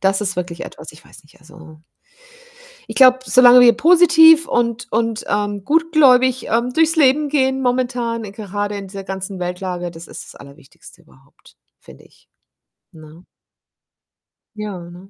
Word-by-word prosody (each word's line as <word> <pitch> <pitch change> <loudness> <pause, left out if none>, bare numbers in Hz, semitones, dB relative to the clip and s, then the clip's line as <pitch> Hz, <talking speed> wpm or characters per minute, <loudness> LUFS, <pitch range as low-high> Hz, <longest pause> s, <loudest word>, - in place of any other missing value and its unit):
das 195 +1 0
ist 195 -3 -4
wirklich 175 -2 -6
etwas 155 0 -12
ich 155 - -19
weiß - - -17
nicht, 150 - -25
also 160 0 -17 1.1
Ich - - -8
glaube, 255 -1 +5
solange 250 -1 +5
wir 240 -1 +6
positiv 325 +2 +4
und 235 0 -2
und, 225 0 -3
ähm, 205 -1 -3
gutgläubig, 280 -6 +2
ähm, 235 +2 -1
durchs 325 +4 +1
Leben 295 0 +2
gehen 265 -2 -1
momentan, 245 -2 -3
gerade 205 0 -6
in 200 -1 -9
dieser 195 0 -10
ganzen 190 0 -7
Weltlage 180 0 -6
das 165 0 -13
ist - - -11
das - - -16
Allerwichtigste 140 0 -18
überhaupt, - - -25 0.2
finde - - -18
ich, - - -27 0.6
ne? 155 +2 -17 1.3
Ja, 210 -3 -7
ne? 180 +3 -15
215 Hz, 145 wpm, -17 LUFS, 180-260 Hz, 1.3 s, wir